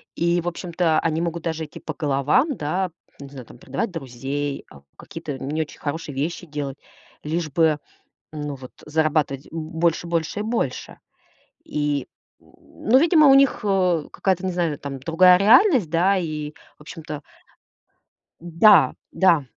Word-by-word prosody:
И, 170 Hz, +1 st, +1 dB
в 170 Hz, -, -7 dB
общем-то, 170 Hz, -2 st, 0 dB
они 160 Hz, 0 st, -1 dB
могут 170 Hz, -1 st, -3 dB
даже 160 Hz, -1 st, -3 dB
идти 150 Hz, -, -12 dB
по -, -, -6 dB
головам, 150 Hz, -, +1 dB
да. 180 Hz, +5 st, -2 dB, 0.3 s
Не 140 Hz, -1 st, -9 dB
знаю, 135 Hz, -3 st, -10 dB
там: -, -, -15 dB
предавать 135 Hz, -, -4 dB
друзей, 140 Hz, -1 st, -4 dB
э, -, -, -15 dB, 0.2 s
какие-то 150 Hz, -5 st, -7 dB
не 150 Hz, +4 st, -2 dB
очень 155 Hz, -, -7 dB
хорошие 145 Hz, -1 st, -5 dB
вещи 165 Hz, +6 st, -3 dB
делать. 145 Hz, -3 st, -5 dB, 0.5 s
Лишь 160 Hz, +1 st, -2 dB
бы, 155 Hz, 0 st, +2 dB, 0.5 s
ну, 150 Hz, -2 st, -5 dB
вот 130 Hz, -1 st, -12 dB
зарабатывать 150 Hz, -3 st, 0 dB
больше, 165 Hz, +1 st, -1 dB
больше 170 Hz, +3 st, -2 dB
и -, -, -1 dB
больше. 220 Hz, -, -3 dB, 0.7 s
И, 145 Hz, -2 st, -2 dB, 0.3 s
н -, -, -26 dB, 0.4 s
ну, 255 Hz, -, +8 dB
видимо, 315 Hz, -1 st, +5 dB
у 270 Hz, -, +8 dB
них, 275 Hz, -1 st, +4 dB
э, 185 Hz, -6 st, +1 dB
какая-то, 190 Hz, -1 st, -1 dB
не 185 Hz, -, -1 dB
знаю, 170 Hz, -4 st, -1 dB
там 135 Hz, -1 st, -6 dB
другая 180 Hz, +6 st, +5 dB
реальность, 240 Hz, -, +5 dB
да? 180 Hz, +5 st, +2 dB
И 155 Hz, -4 st, -4 dB, 0.3 s
в -, -, -21 dB
общем-то 155 Hz, -1 st, -8 dB, 1.2 s
Да, 175 Hz, +5 st, +5 dB, 0.2 s
да. 170 Hz, -7 st, +3 dB
160 Hz, 155 wpm, -22 LUFS, 145-180 Hz, 1.2 s, ну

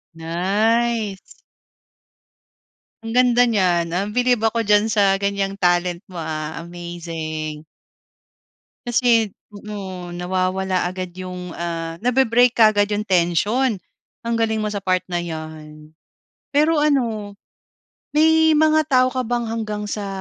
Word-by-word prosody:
Nice! 205 Hz, +6 st, 0 dB, 1.9 s
Ang 225 Hz, -, -5 dB
ganda 245 Hz, 0 st, +4 dB
niyan, 180 Hz, -7 st, +1 dB
uhm, 200 Hz, +4 st, -2 dB
bilib 245 Hz, -3 st, +2 dB
ako 230 Hz, +1 st, -1 dB
diyan 210 Hz, +1 st, +3 dB
sa 200 Hz, -3 st, +2 dB
ganyang 200 Hz, 0 st, -2 dB
talent 175 Hz, -1 st, +1 dB
mo, 185 Hz, -, -14 dB
ah, 155 Hz, 0 st, -5 dB
amazing! 165 Hz, -3 st, -6 dB, 1.2 s
Kasi, 235 Hz, -3 st, +2 dB, 0.2 s
oo. 190 Hz, -4 st, -7 dB
Nawawala 185 Hz, +1 st, -1 dB
agad 185 Hz, -1 st, -6 dB
yung, 180 Hz, -1 st, -7 dB
ah, 165 Hz, -1 st, -4 dB
nabe-break 245 Hz, -1 st, +4 dB
kaagad 215 Hz, -3 st, +4 dB
yung 210 Hz, +1 st, -2 dB
tension. 195 Hz, -, +1 dB, 0.5 s
Ang 235 Hz, -, 0 dB
galing 220 Hz, -1 st, 0 dB
mo -, -, -1 dB
sa 205 Hz, -, -3 dB
part 185 Hz, -1 st, +1 dB
na 175 Hz, -, 0 dB
'yan! 155 Hz, -2 st, -8 dB, 0.6 s
Pero 305 Hz, +3 st, +3 dB
ano, 235 Hz, -9 st, 0 dB, 0.8 s
may 320 Hz, +1 st, +5 dB
mga 310 Hz, 0 st, +4 dB
tao 255 Hz, -3 st, +4 dB
ka 255 Hz, -, 0 dB
bang 240 Hz, 0 st, -1 dB
hanggang 215 Hz, -2 st, -4 dB
sa, 205 Hz, -1 st, -3 dB
200 Hz, 120 wpm, -21 LUFS, 175-230 Hz, 1.9 s, may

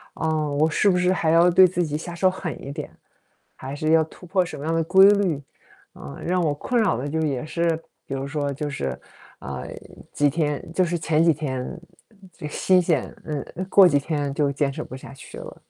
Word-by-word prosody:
啊， 155 Hz, -2 st, -1 dB
我 150 Hz, +3 st, +2 dB
是 200 Hz, +6 st, +2 dB
不 180 Hz, -, +2 dB
是 180 Hz, +1 st, +2 dB
还 160 Hz, -3 st, +1 dB
要 170 Hz, +2 st, +6 dB
对 185 Hz, +2 st, +7 dB
自 180 Hz, 0 st, 0 dB
己 150 Hz, -2 st, -2 dB
下 170 Hz, +2 st, -7 dB
手 185 Hz, +2 st, +3 dB
狠 185 Hz, -3 st, -6 dB
一 140 Hz, -, -6 dB
点？ -, -, -7 dB, 0.7 s
还 135 Hz, +2 st, -6 dB
是 155 Hz, +2 st, -1 dB
要 160 Hz, 0 st, +5 dB
突 180 Hz, -, -15 dB
破 185 Hz, +1 st, +1 dB
什 175 Hz, -, -8 dB
么 140 Hz, -, -8 dB
样 165 Hz, -, 0 dB
的 165 Hz, -, +2 dB
规 190 Hz, +4 st, +7 dB
律？ 185 Hz, -8 st, +1 dB, 0.5 s
嗯， 70 Hz, 0 st, -9 dB
让 180 Hz, +1 st, +1 dB
我 155 Hz, -4 st, +1 dB
困 235 Hz, +10 st, 0 dB
扰 205 Hz, -, +2 dB
的 140 Hz, +4 st, -4 dB
就 160 Hz, -, -2 dB
也 145 Hz, -5 st, -1 dB
是 170 Hz, +2 st, -2 dB, 0.4 s
比 -, -, -6 dB
如 135 Hz, 0 st, -3 dB
说 145 Hz, -1 st, -2 dB
就 145 Hz, +2 st, -4 dB
是， 70 Hz, -, -4 dB, 0.4 s
呃， 65 Hz, -, -6 dB, 0.5 s
几 145 Hz, 0 st, +3 dB
天 150 Hz, -1 st, -1 dB
就 185 Hz, +1 st, +2 dB
是 170 Hz, 0 st, -1 dB
前 160 Hz, -1 st, +1 dB
几 165 Hz, -1 st, +5 dB
天， 135 Hz, -3 st, -4 dB, 0.5 s
嗯， 200 Hz, -4 st, -19 dB
这 160 Hz, -3 st, -8 dB
新 180 Hz, +4 st, +3 dB
鲜 165 Hz, -6 st, -1 dB
嗯， 150 Hz, -3 st, -3 dB, 0.3 s
过 195 Hz, -1 st, +7 dB
几 145 Hz, -4 st, +3 dB
天 145 Hz, -2 st, -2 dB
就 145 Hz, -1 st, +1 dB
坚 140 Hz, 0 st, 0 dB
持 -, -, -6 dB
不 -, -, -9 dB
下 135 Hz, -, -11 dB
去 135 Hz, -, -12 dB
了。 -, -, -10 dB
155 Hz, 240 characters per minute, -23 LUFS, 145-175 Hz, 0.7 s, 对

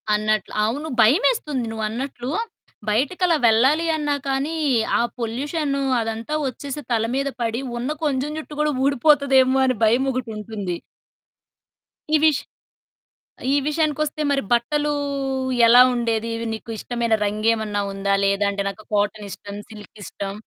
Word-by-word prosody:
అన్నట్లు. 215 Hz, 0 st, 0 dB
అవును. 290 Hz, +8 st, -2 dB
భయమేస్తుంది 290 Hz, -, +2 dB
నువ్వన్నట్లు, 240 Hz, +4 st, -4 dB, 0.6 s
బయటికలా 330 Hz, -, +2 dB
వెళ్ళాలి 265 Hz, +9 st, +4 dB
అన్నా 295 Hz, -1 st, 0 dB
కానీ, 275 Hz, +4 st, -1 dB, 0.4 s
ఆ -, -, +3 dB, 0.2 s
పొల్యూషనూ 275 Hz, +5 st, -2 dB, 0.2 s
అదంతా 225 Hz, +5 st, -4 dB
వచ్చేసి 280 Hz, +3 st, -5 dB
తల 225 Hz, -1 st, +2 dB
మీద 275 Hz, +1 st, 0 dB
పడి, 230 Hz, +2 st, -1 dB, 0.2 s
ఉన్న 250 Hz, +4 st, -3 dB, 0.2 s
కొంచెం 275 Hz, 0 st, 0 dB
జుట్టు 300 Hz, -1 st, -9 dB
కూడా 300 Hz, -1 st, +1 dB
ఊడిపోతదేమో 270 Hz, -1 st, +4 dB
అని 255 Hz, -2 st, +1 dB
భయమొకటుంటుంది. 220 Hz, -6 st, -1 dB, 1.4 s
ఈ -, -, +7 dB
విష్ 310 Hz, -4 st, +4 dB, 1.1 s
ఈ -, -, +3 dB
విషయానికొస్తే 305 Hz, 0 st, 0 dB
మరి 275 Hz, -, +2 dB
బట్టలూ 295 Hz, +5 st, +1 dB, 0.8 s
ఎలా 245 Hz, +2 st, +8 dB
ఉండేది? 230 Hz, -1 st, -1 dB, 0.2 s
నీకు 225 Hz, +1 st, -8 dB
ఇష్టమైన 235 Hz, 0 st, -2 dB
రంగేమన్నా 215 Hz, 0 st, 0 dB
ఉందా? 195 Hz, 0 st, -1 dB
లేదాంటే 200 Hz, 0 st, +1 dB
నాకు 215 Hz, +2 st, -10 dB
కాటనిష్టం, 205 Hz, -1 st, -2 dB
సిల్కిష్టం. 205 Hz, -2 st, -8 dB
240 Hz, 110 wpm, -22 LUFS, 215-285 Hz, 1.4 s, ఎలా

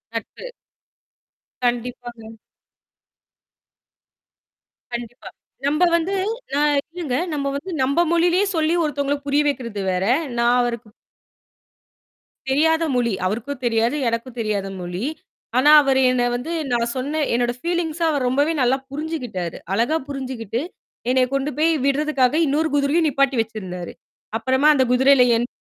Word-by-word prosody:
நட்பு. -, -, -6 dB, 1.1 s
கண்டிப்பாங்க. 240 Hz, -1 st, -3 dB, 2.6 s
கண்டிப்பா. 240 Hz, 0 st, -7 dB, 0.4 s
நம்ப 300 Hz, +5 st, +2 dB
வந்து 340 Hz, +4 st, 0 dB, 0.5 s
அ -, -, +2 dB, 0.3 s
இல்லங்க. 335 Hz, -8 st, -3 dB, 0.2 s
நம்ம 280 Hz, -2 st, -2 dB
வந்து 360 Hz, +7 st, -5 dB
நம்ப 280 Hz, +5 st, +1 dB
மொழியிலயே 350 Hz, +3 st, +3 dB
சொல்லி, 320 Hz, +1 st, +1 dB
ஒருத்தவங்கள 285 Hz, -2 st, -1 dB
புரிய 285 Hz, +1 st, +3 dB
வைக்கிறது 235 Hz, -7 st, -3 dB
வேற, 180 Hz, +1 st, -1 dB, 0.3 s
நான் 240 Hz, +1 st, +3 dB
அவருக்கு 235 Hz, -2 st, -3 dB, 1.6 s
தெரியாத 320 Hz, +4 st, +2 dB
மொழி 235 Hz, -4 st, +1 dB
அவருக்கும் 240 Hz, +8 st, -3 dB
தெரியாது. 230 Hz, +3 st, +1 dB
எனக்கும் 235 Hz, +2 st, -3 dB
தெரியாத 210 Hz, -3 st, -1 dB
மொழி. 175 Hz, +3 st, -5 dB, 0.5 s
ஆனா, 295 Hz, +4 st, +6 dB
அவரு 265 Hz, -1 st, +2 dB
என்ன 245 Hz, -1 st, +1 dB
வந்து, 255 Hz, +7 st, -4 dB, 0.2 s
நான் 235 Hz, 0 st, 0 dB
சொன்ன 290 Hz, +4 st, -2 dB
என்னோட 240 Hz, 0 st, +1 dB
ஃபீலிங்ச 340 Hz, -1 st, -2 dB
அவர் 285 Hz, -4 st, 0 dB
ரொம்பவே 285 Hz, +5 st, +2 dB
நல்லா 255 Hz, +1 st, +3 dB
புரிஞ்சுக்கிட்டாரு. 270 Hz, -, -4 dB, 0.2 s
அழகா 240 Hz, +10 st, +1 dB
புரிஞ்சுகிட்டு, 255 Hz, -5 st, -4 dB, 0.5 s
என்னைய 255 Hz, 0 st, +3 dB
கொண்டு 275 Hz, +1 st, 0 dB
போய் 325 Hz, +2 st, +3 dB
விட்றதுக்காக, 280 Hz, -2 st, +2 dB
இன்னொரு 305 Hz, +3 st, +1 dB
குதிரையும் 290 Hz, +3 st, +2 dB
நிப்பாட்டி 275 Hz, -1 st, +1 dB
வச்சிருந்தாரு. 190 Hz, -6 st, -6 dB, 0.5 s
அப்புறமா 260 Hz, +5 st, +2 dB
அந்தக் 260 Hz, -3 st, +2 dB
குதிரையில 265 Hz, +1 st, +5 dB
என் 235 Hz, +1 st, 0 dB
260 Hz, 120 wpm, -21 LUFS, 235-295 Hz, 2.6 s, ஆனா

